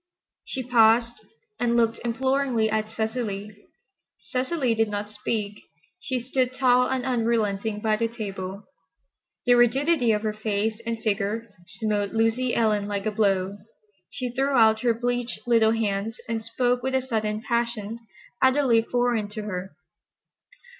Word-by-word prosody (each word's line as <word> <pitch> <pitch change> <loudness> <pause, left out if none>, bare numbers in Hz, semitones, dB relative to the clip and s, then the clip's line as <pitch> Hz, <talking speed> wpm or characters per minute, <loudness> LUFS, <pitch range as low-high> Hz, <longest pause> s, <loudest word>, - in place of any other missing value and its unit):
She 260 - -4
paused 235 -1 +4 0.5
and 235 -1 +2
looked 230 -1 +2
imploringly 255 -2 +1
at 215 0 -1
Cecily. 220 -2 -3 0.6
Cecily 255 0 -1
did 225 -1 +1
not 205 0 -4
speak. 210 -1 -3 0.4
She 260 -7 -2
stood 255 +1 -1
tall 250 -1 +4
and 260 -2 -2
unrelenting 225 -4 0
by 215 -1 +1
the 230 +1 +1
table. 200 -3 -6 0.8
The 245 - +5
rigidity 245 +2 +3
of 210 0 0
her 215 -1 -1
face 215 +1 -2
and 230 0 -1
figure 215 +1 -1
smote 210 -1 -2
Lucy 225 +3 +1
Ellen 210 -3 +1
like 200 -1 -3
a 215 - +1
blow. 200 -2 0 0.5
She 250 -2 -4
threw 270 +3 0
out 220 -1 +5
her 235 -2 +2
bleached 245 +1 -2
little 230 -2 +4
hands 215 0 -2
and 230 -1 -2
spoke 245 +2 0
with 265 +1 -1
a 260 - +2
sudden 215 -3 -2
passion 235 -2 -1 0.4
utterly 260 -3 +4
foreign 240 -2 0
to 215 0 -6
her. 190 -2 -5
225 Hz, 140 wpm, -25 LUFS, 210-245 Hz, 0.8 s, The